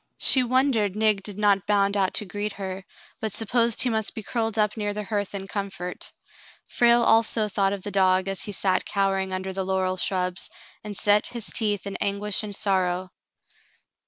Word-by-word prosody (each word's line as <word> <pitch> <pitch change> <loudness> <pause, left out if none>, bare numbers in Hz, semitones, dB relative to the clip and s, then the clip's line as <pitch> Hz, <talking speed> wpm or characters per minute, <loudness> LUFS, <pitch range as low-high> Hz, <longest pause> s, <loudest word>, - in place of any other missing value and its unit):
She 260 - +5
wondered 245 -5 +1
Nig 215 -2 +2
did 205 0 -6
not 200 -2 +2
bound 200 -1 +2
out 195 -2 +1
to 210 - +1
greet 205 +2 -4
her, 190 -1 -6 0.4
but 220 -2 -2
supposed 230 +1 +2
he 250 - +2
must 220 0 -1
be 220 - -6
curled 225 0 -2
up 210 -1 +1
near 205 -2 -3
the 210 - -3
hearth 205 -1 -3
in 195 -1 -6
comfort. 195 -3 -5 0.6
Frale 235 0 +3
also 225 -1 +3
thought 195 -1 +1
of 200 -2 -5
the 205 - -4
dog 185 -1 +2
as 195 -1 -2
he 205 - -3
sat 190 -1 0
cowering 195 -1 -1
under 190 0 -4
the 190 0 -2
laurel 185 0 -1
shrubs, 180 -1 -1 0.3
and 210 -2 -5
set 205 0 +3
his 235 -3 -5
teeth 210 -4 0
in 200 - -4
anguish 200 0 0
and 205 -2 -5
sorrow. 185 -2 0
200 Hz, 190 wpm, -25 LUFS, 190-215 Hz, 0.6 s, She